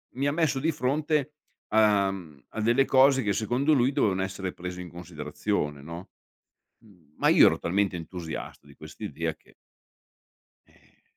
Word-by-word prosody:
mi 135 Hz, +2 st, 0 dB
ha 145 Hz, -, +2 dB
messo 155 Hz, -3 st, +1 dB
di 160 Hz, +4 st, +1 dB
fronte 150 Hz, +1 st, 0 dB, 0.4 s
a 105 Hz, -2 st, +4 dB
mhmm, 80 Hz, -8 st, -10 dB
a 110 Hz, -, -5 dB
delle 120 Hz, +5 st, +3 dB
cose 135 Hz, 0 st, +5 dB
che 105 Hz, -1 st, +1 dB
secondo 125 Hz, +9 st, +1 dB
lui 130 Hz, -1 st, +3 dB
dovevano 95 Hz, -8 st, +1 dB
essere 95 Hz, -1 st, -4 dB
prese 90 Hz, 0 st, -7 dB
in 90 Hz, -, -8 dB
considerazione, 75 Hz, -2 st, -4 dB
no. 85 Hz, +4 st, -9 dB, 0.7 s
Mhmm, 90 Hz, -10 st, -23 dB
ma -, -, +2 dB
io -, -, +7 dB
ero -, -, +1 dB
talmente 95 Hz, +1 st, 0 dB
entusiasta 85 Hz, -3 st, -7 dB
di 70 Hz, -, -16 dB
quest'idea 80 Hz, 0 st, -5 dB
che -, -, -25 dB, 1.1 s
eh, -, -, -28 dB
100 Hz, 155 wpm, -27 LUFS, 85-135 Hz, 1.1 s, io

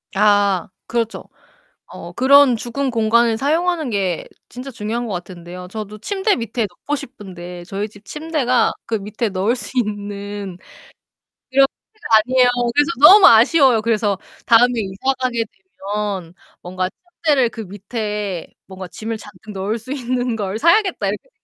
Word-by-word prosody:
아. 205 Hz, -3 st, +3 dB, 0.2 s
그렇죠. 230 Hz, -1 st, -3 dB, 0.6 s
어 -, -, -10 dB
그런 275 Hz, -1 st, +6 dB
죽은 260 Hz, +4 st, -3 dB
공간을 230 Hz, 0 st, +2 dB
사용하는 320 Hz, +1 st, 0 dB
게 190 Hz, -5 st, -1 dB, 0.2 s
진짜 255 Hz, +2 st, -8 dB
중요한 235 Hz, 0 st, -3 dB
것 210 Hz, -, -4 dB
같은데요 180 Hz, 0 st, -8 dB
저도 215 Hz, +1 st, -7 dB
침대 400 Hz, -, 0 dB
밑에 230 Hz, -1 st, -2 dB
넣고 290 Hz, +11 st, -4 dB
싶은데 180 Hz, -9 st, -9 dB
저희 200 Hz, +4 st, -4 dB
집 205 Hz, 0 st, -18 dB
침대가 300 Hz, -2 st, 0 dB
그 225 Hz, -, -2 dB
밑에 215 Hz, +3 st, -3 dB
넣을 200 Hz, +5 st, 0 dB
수 245 Hz, -, -6 dB
있는 205 Hz, -3 st, -4 dB, 0.9 s
그런 275 Hz, +1 st, +6 dB, 0.3 s
침대가 430 Hz, -, +1 dB
아니에요. 250 Hz, +3 st, +3 dB, 0.3 s
그래서 295 Hz, +3 st, +3 dB
너무 385 Hz, +5 st, +10 dB
아쉬워요. 240 Hz, 0 st, +5 dB
그래서 215 Hz, -3 st, 0 dB, 0.3 s
다음에 240 Hz, +1 st, +5 dB
이사가게 240 Hz, +4 st, -1 dB
되면 195 Hz, -2 st, -6 dB, 0.3 s
뭔가 185 Hz, +1 st, -3 dB, 0.4 s
'침대를 275 Hz, -6 st, +4 dB
그 225 Hz, -, -8 dB
밑에 205 Hz, -2 st, -4 dB, 0.2 s
뭔가 190 Hz, -1 st, -8 dB
짐을 220 Hz, +6 st, -5 dB
잔뜩 210 Hz, 0 st, -12 dB
넣을 200 Hz, +3 st, -2 dB
수 225 Hz, +4 st, -10 dB
있는 250 Hz, -2 st, -2 dB
걸 205 Hz, +1 st, -3 dB
사야겠다.' 370 Hz, +5 st, +3 dB
이렇게 -, -, -4 dB
220 Hz, 305 characters per minute, -19 LUFS, 200-255 Hz, 0.9 s, 너무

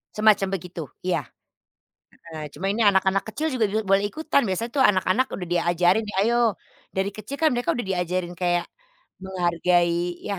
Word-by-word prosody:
Semacam 215 Hz, -2 st, +4 dB
begitu. 175 Hz, -1 st, -8 dB, 0.3 s
Iya. 180 Hz, -, +1 dB, 1.1 s
Heeh. 155 Hz, -, -6 dB
Cuma 190 Hz, -, -3 dB
ini 220 Hz, -, -3 dB
anak-anak 195 Hz, -2 st, +3 dB
kecil 300 Hz, +8 st, -2 dB
juga 230 Hz, -5 st, +1 dB
juga 215 Hz, +2 st, -1 dB
boleh 195 Hz, +1 st, +3 dB
ikutan, 310 Hz, +5 st, +1 dB
biasanya 210 Hz, +6 st, -2 dB
tuh 270 Hz, -, +4 dB
anak-anak 190 Hz, +6 st, +1 dB
udah 180 Hz, -, -6 dB
diajarin, 175 Hz, +4 st, +2 dB
nih, 205 Hz, -, -6 dB
ayo, 235 Hz, -3 st, +2 dB, 0.4 s
dari 195 Hz, +1 st, 0 dB
kecil 215 Hz, +6 st, -6 dB
kan 320 Hz, -, +5 dB
mereka 245 Hz, 0 st, 0 dB
udah 240 Hz, -, -3 dB
diajarin 180 Hz, -1 st, -1 dB
kayak 175 Hz, 0 st, 0 dB, 0.6 s
menghargai, 175 Hz, -1 st, +1 dB
ya 205 Hz, -, -1 dB
190 Hz, 160 wpm, -24 LUFS, 175-220 Hz, 1.1 s, kan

